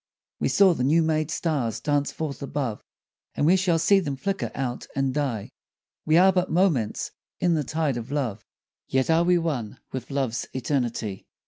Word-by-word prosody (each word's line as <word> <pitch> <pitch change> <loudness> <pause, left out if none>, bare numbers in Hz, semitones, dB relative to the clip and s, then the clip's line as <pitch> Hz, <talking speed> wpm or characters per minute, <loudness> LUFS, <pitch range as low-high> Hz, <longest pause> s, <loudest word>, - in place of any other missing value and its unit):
We - - +1
saw 195 -3 +5
the 125 - -2
new 160 +5 +4
made 155 -1 0
stars 145 -9 -1
dance 145 -1 0
forth 150 -5 -5
above, 140 -5 -3 0.5
And - - +1
we 175 +4 +6
shall 185 -3 +2
see 195 +5 +4
them 145 -7 -3
flicker 190 - -2
out 125 -2 -3
and 135 -1 0
die, 130 -8 -2 0.6
We 155 +1 +5
are 190 +2 +6
but 180 0 +1
moments 160 - +1 0.3
in 175 -1 +2
the 155 -2 +1
tide 155 -3 -1
of 120 +3 -6
love, 125 -8 -2 0.4
Yet 130 +4 +1
are 165 +1 +4
we 180 0 +4
one 140 -11 -2
with 130 -2 -5
love's 130 -4 -2
eternity. 120 -6 -2
145 Hz, 180 wpm, -25 LUFS, 125-165 Hz, 0.6 s, we